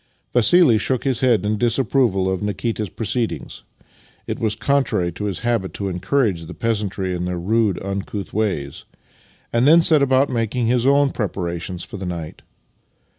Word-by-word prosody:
Vassili 125 0 +5
shook 130 +1 0
his 130 -3 0
head 120 -5 +2
in 105 0 0
disapproval 120 -5 +1
of 95 -1 -1
Nikita's 105 +1 -2
proceedings 115 +4 -3 0.6
(it - - -4
was 110 -2 0
contrary 115 -7 0
to 105 +5 -6
his 95 -4 -3
habit 115 -7 -1
to 100 -1 -3
encourage 95 -1 0
the 90 - -9
peasantry 100 -5 -1
in 90 0 -3
their 90 -1 -3
rude, 105 +2 +1
uncouth 100 0 -5
ways), 95 -10 -2 0.7
and 120 +3 +3
then 165 +2 +7
set 155 -4 +5
about 135 0 +3
making 120 0 -1
his 125 +2 +2
own 140 0 +4
preparations 90 -4 -4
for - - -8
the 95 -1 -5
night. 85 -3 -6
110 Hz, 160 wpm, -21 LUFS, 95-125 Hz, 0.7 s, then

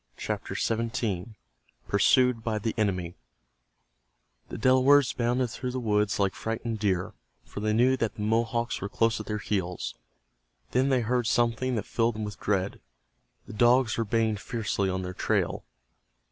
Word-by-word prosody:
CHAPTER - - -4
XVII—PURSUED 110 - 0
BY 110 -2 -1
THE 110 +1 -2
ENEMY 90 -6 -1 1.4
The - - -6
Delawares 130 +2 +4
bounded 120 0 0
through 125 +3 -4
the 130 +1 -3
woods 105 -3 +1
like 100 -2 +1
frightened 115 0 -4
deer, 95 -4 0 0.3
for - - -8
they 110 +1 0
knew 125 +4 +4
that 115 -4 -2
the 105 - -5
Mohawks 115 +2 0
were 100 - -3
close 115 +2 +1
at - - -7
their 105 - -2
heels. 95 -4 -3 0.8
Then 130 +2 +2
they 130 -2 +3
heard 120 0 0
something 120 +1 +1
that 105 - -2
filled 115 -1 0
them 110 - -4
with 105 -1 -6
dread. 100 -1 -1 0.6
The - - -10
dogs 120 +1 +4
were 115 - 0
baying 110 0 +1
fiercely 105 -2 -2
on 95 0 -2
their 90 0 -5
trail. - - -1
115 Hz, 155 wpm, -27 LUFS, 105-120 Hz, 1.4 s, Delawares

